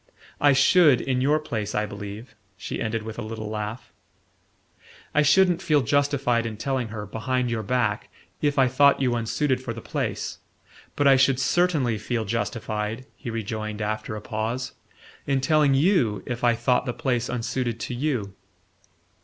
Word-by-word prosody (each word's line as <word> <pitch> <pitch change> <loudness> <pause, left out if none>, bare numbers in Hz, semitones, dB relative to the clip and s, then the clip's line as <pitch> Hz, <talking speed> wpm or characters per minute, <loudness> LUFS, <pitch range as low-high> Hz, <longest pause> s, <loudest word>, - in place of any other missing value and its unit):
"I 145 - +5
should, 140 0 +5
in 130 -1 -1
your 150 +3 +3
place, 110 -9 -4
I 105 0 +1
believe," 105 +3 -8 0.2
she 90 - -5
ended 110 0 -2
with 110 +1 -7
a - - -3
little 110 -1 -5
laugh. 105 +2 -5 1.2
"I 150 - +4
shouldn't 180 +3 +4
feel 150 -6 +3
justified 135 -3 +1
in 110 -2 -6
telling 130 +1 -1
her, 105 -1 -6
behind 125 +4 -2
your 115 -1 -1
back, 110 -1 -1 0.3
if 145 0 +1
I 130 -1 +5
thought 140 +2 +4
you 130 -3 +1
unsuited 125 +3 0
for 125 -3 -4
the - - -6
place; - - -3 0.6
but 145 - +1
I 135 -1 +7
should 130 0 +3
certainly 145 -8 +1
feel 115 +1 -2
justified," 110 +1 -3
he 125 - -7
rejoined 110 -1 -4
after 110 0 -3
a 105 - -6
pause, 115 +5 -3 0.6
"in 135 -1 +2
telling 145 0 +3
YOU 135 - +2
if 125 0 -5
I 120 -1 +4
thought 125 +3 +1
the 120 - -1
place 125 -5 -1
unsuited 120 -1 -2
to - - -4
you." 120 -7 -2
120 Hz, 165 wpm, -25 LUFS, 110-135 Hz, 1.2 s, I